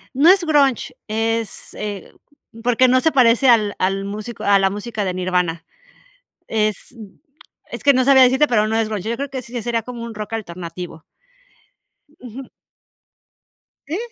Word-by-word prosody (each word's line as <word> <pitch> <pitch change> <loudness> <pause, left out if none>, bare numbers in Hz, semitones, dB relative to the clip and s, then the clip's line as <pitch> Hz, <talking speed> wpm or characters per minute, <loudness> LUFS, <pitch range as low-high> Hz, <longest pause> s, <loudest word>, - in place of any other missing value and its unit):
No 295 +6 +5
es 380 -1 +5
grunge, 285 -6 +1
es, 225 0 -3
eh, 205 -3 -6 0.5
porque 245 +1 +3
no 255 +1 +4
se 320 +4 +2
parece 250 0 +4
al 215 -4 +4
al 195 +1 -1
músico 215 +3 -7
a 200 0 +4
la 195 0 +2
música 210 0 -4
de 185 - -2
Nirvana. 180 -2 -1 0.8
Es, 215 -1 -2
mm, 210 -4 -13 0.5
es - - -6
que 280 - +6
no 255 -1 +2
sabía 270 -1 +6
decirte, 260 +4 +4
pero 215 -5 +1
no 220 - 0
es 225 -1 0
grunge, 215 0 -4
yo 235 - -2
creo 280 +1 -5
que 260 -2 -5
sí, 235 - -15
ya 240 -3 -4
sería 235 -1 -1
como 240 +1 -8
un 230 - -8
rock 215 +1 -6
alternativo. 175 -4 -7 1.2
Ujú. 250 +2 -10 1.4
¿Sí? 320 - -3
225 Hz, 170 wpm, -20 LUFS, 200-255 Hz, 1.4 s, que